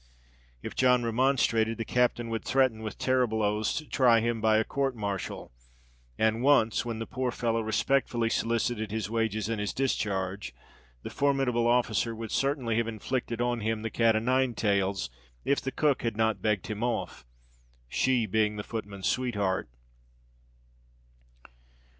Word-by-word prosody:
If - - -5
John 125 -1 +4
remonstrated, 115 -2 +2
the 115 - -3
captain 120 -1 +1
would 115 - -2
threaten, 130 -4 +2
with 110 -1 -6
terrible 125 -4 +1
oaths, 105 +1 0
to 155 - -4
try 120 -3 +4
him 115 0 -1
by 110 -1 +4
a 110 - +3
court 135 +2 -1
martial; 100 -4 -4 0.7
and 110 +1 +1
once, 130 -6 +3
when 115 -2 -4
the 115 - -4
poor 130 +1 -2
fellow 115 -1 -1
respectfully 120 +1 +1
solicited 115 -1 0
his 110 -1 -3
wages 110 -2 -1
and 115 -2 -2
his 105 - -2
discharge, 100 - -2 0.5
the - - -6
formidable 135 -4 +1
officer 120 -1 +1
would 110 -1 -6
certainly 135 -5 0
have 115 -1 +1
inflicted 115 +1 -3
on 120 -1 0
him 110 0 -2
the 115 - -3
cat 115 0 +3
o' - - +3
nine 130 +1 +1
tails, 100 - 0 0.3
if 140 - +2
the 135 - -3
cook 145 -2 +1
had 115 -3 -2
not 110 -3 +1
begged 105 -3 0
him 105 0 -5
off—she - - -3
being 105 +1 +1
the 105 - -4
footman's 100 -4 -6
sweetheart. 105 - 0
115 Hz, 155 wpm, -28 LUFS, 105-125 Hz, 0.7 s, John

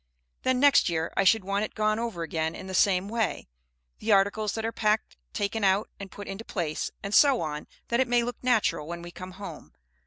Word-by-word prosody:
Then 255 -1 +1
next 280 -7 +5
year 165 -1 -2
I - - +3
should 200 +2 +4
want 200 +2 -1
it - - -5
gone 215 0 +1
over 225 -8 -3
again 160 0 -2
in - - -8
the 190 - -7
same 185 0 +3
way, 225 0 -2 0.5
the 220 - -1
articles 200 +1 +3
that 225 0 -3
are 225 - -1
packed 215 -1 0 0.2
taken 205 +2 -2
out 195 +2 +2
and 200 -1 -7
put 205 +1 -9
into 195 +3 -6
place, 170 -9 -3
and 200 - -4
so 275 -1 +6
on, 150 -1 -4 0.2
that 235 - +1
it 260 - +3
may 240 0 +3
look 245 +1 -5
natural 225 -11 +1
when 170 0 -6
we 175 - -8
come 185 +1 -9
home. 200 +2 -9
200 Hz, 220 wpm, -27 LUFS, 185-225 Hz, 0.5 s, so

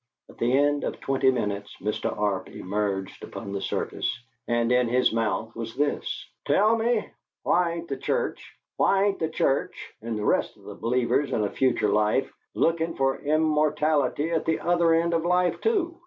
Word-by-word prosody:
At - - -16
the 120 +1 +1
end 145 +2 +2
of - - -3
twenty 135 -1 +2
minutes 105 -5 -2
Mr. 105 +2 -2
Arp 100 -3 -1
emerged 95 -1 -3
upon 100 - -7
the 100 -1 -3
surface, - - -2 0.3
and 120 0 +1
in 125 -1 +3
his 125 +1 +2
mouth 115 0 -1
was 115 0 -6
this: 145 +2 -2 0.2
"Tell 215 +3 +4
me, 230 -1 0 0.4
why 175 -1 +2
ain't 170 0 -6
the 135 - -3
Church - - -3 0.2
why 195 0 +3
ain't 200 -1 +1
the 160 - -1
Church 140 -3 -1
and 115 0 -3
the 105 - -3
rest - - +1
of - - -20
the - - -8
believers 125 +4 0
in 105 - +1
a 100 - -1
future 130 -5 +1
life 105 +5 +1 0.2
lookin' 165 0 +1
for 135 0 +1
immortality 150 -1 +1
at 165 - 0
the 160 - +1
other 170 -1 +3
end 170 +1 +1
of 165 -1 +1
life, 180 0 +1
too? 365 -6 0
135 Hz, 180 wpm, -26 LUFS, 115-165 Hz, 0.4 s, Tell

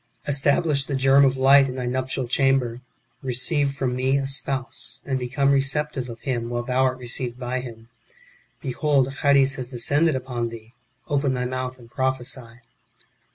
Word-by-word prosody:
Establish 145 0 +2
the 140 - -3
germ 135 +1 +5
of 130 -1 +3
light 135 +1 +6
in 125 - -5
thy 125 -1 -3
nuptial 130 0 -2
chamber. 125 -2 +1 0.4
Keceive 140 +3 +1
from 130 -2 -1
me 130 +2 +1
a 135 - -1
spouse, 135 -1 -3
and 135 -1 -1
become 130 +3 +1
receptive 135 -1 0
of 115 -1 -9
him, 120 -3 -2
while 120 0 -2
thou 125 +1 0
art 130 -1 +2
received 120 0 -4
by 125 0 -3
him. 115 -3 -9 0.7
Behold 135 -1 +1
Charis 140 -1 +4
has 125 -2 -4
descended 145 +5 +1
upon 125 -2 -3
thee; 115 0 -11 0.3
open 140 -2 +1
thy 125 0 -2
mouth 130 0 -4
and 120 -2 -17
prophesy." 125 -2 -3
130 Hz, 160 wpm, -24 LUFS, 125-135 Hz, 0.7 s, light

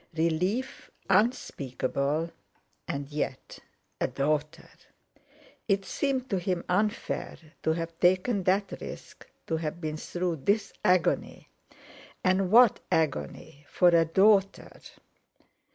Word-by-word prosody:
Relief 180 +10 -1 0.2
unspeakable, 155 - 0 0.6
and 140 0 -4
yet—a 145 -3 -5
daughter! 150 +2 -2 1.0
It 195 -2 +1
seemed 265 -3 -1
to 195 - +1
him 180 -1 -2
unfair. 210 +4 -1 0.2
To 160 - +1
have 165 0 -5
taken 185 +4 +2
that 195 +2 +1
risk—to 160 - -7
have 160 +1 -4
been 155 -2 -4
through 175 +1 -3
this 200 +8 0
agony—and 185 +1 -1
what 235 +1 +6
agony!—for 145 - 0
a 170 -1 +4
daughter! 195 +3 +3
175 Hz, 90 wpm, -28 LUFS, 155-195 Hz, 1.0 s, what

